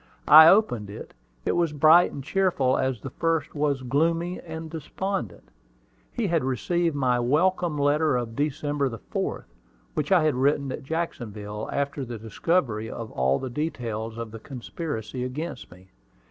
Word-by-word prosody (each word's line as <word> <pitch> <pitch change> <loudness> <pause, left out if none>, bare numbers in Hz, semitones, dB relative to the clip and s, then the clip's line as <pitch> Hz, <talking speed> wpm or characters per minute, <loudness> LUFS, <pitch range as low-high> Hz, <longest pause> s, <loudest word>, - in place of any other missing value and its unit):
I 155 +1 +10
opened 165 - +3
it: 105 - -9 0.3
it - - +2
was 170 -3 +1
bright 155 +4 +6
and 140 - -7
cheerful 155 -6 +1
as 130 -4 -1
the 135 - -7
first 165 0 -1
was 145 -3 0
gloomy 165 +7 0
and 160 -1 -7
despondent. 160 - -5 0.6
He 235 - -2
had 170 -6 +1
received 165 +6 0
my 125 -3 +1
"welcome 160 +5 +1
letter 145 0 +2
of 115 -2 -4
December 145 0 -1
4th," 115 -2 -4 0.5
which - - -2
I 180 -4 +5
had 155 -1 +3
written 140 +1 +1
at - - -5
Jacksonville, 110 -9 -4
after 140 0 -2
the 120 -2 -6
discovery 110 - -1
of 115 -2 -7
all 65 +1 +1
the 130 - -5
details 115 -6 -4
of 115 -2 -5
the 115 - -8
conspiracy 125 -1 -5
against 150 +7 -5
me. 95 +2 -17
140 Hz, 155 wpm, -25 LUFS, 120-160 Hz, 0.6 s, I